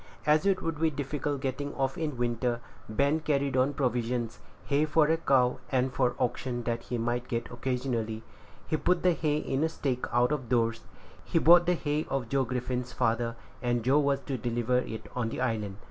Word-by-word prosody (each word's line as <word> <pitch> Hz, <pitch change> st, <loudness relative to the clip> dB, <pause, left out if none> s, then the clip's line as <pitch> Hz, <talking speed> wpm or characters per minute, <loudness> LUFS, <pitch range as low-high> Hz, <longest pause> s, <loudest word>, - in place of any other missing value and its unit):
As 155 Hz, +5 st, +4 dB
it 195 Hz, -2 st, +2 dB
would 165 Hz, -2 st, -2 dB
be 160 Hz, -, +4 dB
difficult 145 Hz, -1 st, -3 dB
getting 140 Hz, +2 st, -3 dB
off 135 Hz, 0 st, 0 dB
in 160 Hz, -2 st, -1 dB
the 145 Hz, -, -7 dB
winter, 120 Hz, 0 st, 0 dB, 0.3 s
Ben 140 Hz, +8 st, +2 dB
carried 140 Hz, -3 st, 0 dB
on 130 Hz, +2 st, +2 dB
provisions, 120 Hz, -3 st, -1 dB, 0.3 s
hay 145 Hz, +1 st, +2 dB
for 155 Hz, 0 st, +4 dB
a 160 Hz, +2 st, +2 dB
cow, 130 Hz, -6 st, +2 dB
and 130 Hz, 0 st, +1 dB
for 125 Hz, -2 st, +1 dB
oxen 125 Hz, -1 st, -1 dB
that 115 Hz, 0 st, -1 dB
he 125 Hz, -, -4 dB
might 120 Hz, +1 st, -1 dB
get 115 Hz, -1 st, -3 dB
occasionally. 120 Hz, -3 st, -2 dB, 0.4 s
He 155 Hz, -, 0 dB
put 180 Hz, +2 st, +1 dB
the 180 Hz, -1 st, +5 dB
hay 150 Hz, -2 st, 0 dB
in 140 Hz, -1 st, -1 dB
a 160 Hz, -, +2 dB
stack 130 Hz, -5 st, -2 dB
out 120 Hz, +3 st, +3 dB
of 135 Hz, -6 st, -2 dB
doors. 115 Hz, -2 st, +1 dB, 0.4 s
He -, -, -1 dB
bought 175 Hz, +2 st, +7 dB
the 180 Hz, -, +4 dB
hay 150 Hz, -1 st, -1 dB
of 135 Hz, -4 st, -2 dB
Joe 135 Hz, 0 st, +2 dB
Griffin's 125 Hz, 0 st, -3 dB
father, 115 Hz, -1 st, 0 dB, 0.3 s
and 120 Hz, -2 st, 0 dB
Joe 135 Hz, +5 st, +4 dB
was 140 Hz, -1 st, +1 dB
to 130 Hz, -1 st, -4 dB
deliver 120 Hz, +2 st, +1 dB
it 110 Hz, -3 st, -5 dB
on 120 Hz, -3 st, -1 dB
the -, -, -5 dB
island. 105 Hz, -5 st, -1 dB
130 Hz, 200 wpm, -29 LUFS, 120-145 Hz, 0.4 s, bought